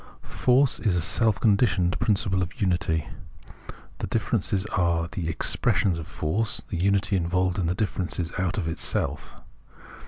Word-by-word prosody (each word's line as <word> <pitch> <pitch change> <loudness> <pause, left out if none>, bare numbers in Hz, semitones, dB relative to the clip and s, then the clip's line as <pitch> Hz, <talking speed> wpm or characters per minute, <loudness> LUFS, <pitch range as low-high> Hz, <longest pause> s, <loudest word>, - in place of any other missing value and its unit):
"Force" 130 +2 +2
is 105 -6 +1
a - - +2
self 105 +4 +1
conditioned 100 -5 +2
principle 100 -3 +1
of 90 +7 -5
unity; 85 -5 0 0.9
the - - -3
differences 95 -1 0
are 85 -2 +1
the 85 -1 -4
"expressions 85 +2 +1
of 80 - -7
force,'' 100 +7 -2
the 90 -4 -2
unity 100 +1 +2
evolves 90 +1 0
the 85 +2 0
diiferences 90 -4 -2
out 95 0 -1
of 90 -5 -2
itself. 80 0 -1
90 Hz, 135 wpm, -25 LUFS, 85-100 Hz, 0.9 s, Force